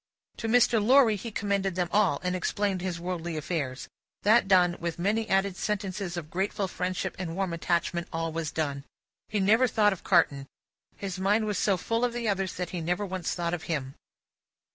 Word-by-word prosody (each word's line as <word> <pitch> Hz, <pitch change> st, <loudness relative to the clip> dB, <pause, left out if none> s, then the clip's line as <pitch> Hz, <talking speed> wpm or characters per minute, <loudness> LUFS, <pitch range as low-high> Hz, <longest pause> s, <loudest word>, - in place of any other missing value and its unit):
To 225 Hz, -, -3 dB
Mr. 235 Hz, -1 st, +4 dB
Lorry, 245 Hz, -1 st, +6 dB
he 220 Hz, +4 st, -6 dB
commended 200 Hz, -3 st, -1 dB
them 180 Hz, -1 st, 0 dB
all, 200 Hz, -9 st, +3 dB
and 180 Hz, 0 st, 0 dB
explained 195 Hz, +1 st, -1 dB
his 180 Hz, -2 st, -3 dB
worldly 170 Hz, -2 st, -4 dB
affairs. 145 Hz, -5 st, -3 dB, 0.4 s
That 220 Hz, +1 st, +5 dB
done, 180 Hz, -3 st, +4 dB
with 170 Hz, -1 st, -3 dB
many 215 Hz, +5 st, 0 dB
added 195 Hz, 0 st, +2 dB
sentences 195 Hz, -3 st, -3 dB
of 155 Hz, -2 st, -6 dB
grateful 195 Hz, +2 st, -1 dB
friendship 180 Hz, 0 st, -3 dB
and 170 Hz, -3 st, -4 dB
warm 190 Hz, -2 st, -1 dB
attachment, 170 Hz, 0 st, -1 dB
all 165 Hz, 0 st, -2 dB
was 160 Hz, -1 st, -3 dB
done. 140 Hz, -4 st, -2 dB, 0.5 s
He 215 Hz, -, 0 dB
never 220 Hz, +6 st, +4 dB
thought 210 Hz, -3 st, +3 dB
of 190 Hz, -, -11 dB
Carton. 140 Hz, -7 st, +2 dB, 0.5 s
His 190 Hz, -2 st, -5 dB
mind 205 Hz, +3 st, +2 dB
was 210 Hz, -3 st, -1 dB
so 195 Hz, -3 st, +2 dB
full 230 Hz, +6 st, -1 dB
of 245 Hz, -1 st, +1 dB
the 240 Hz, -1 st, -2 dB
others, 195 Hz, -2 st, -1 dB
that 180 Hz, -1 st, -4 dB
he 180 Hz, -2 st, -3 dB
never 180 Hz, +5 st, -1 dB
once 185 Hz, -3 st, -3 dB
thought 170 Hz, -1 st, -2 dB
of 175 Hz, -, -4 dB
him. 135 Hz, -5 st, -2 dB
185 Hz, 190 wpm, -28 LUFS, 170-205 Hz, 0.5 s, Lorry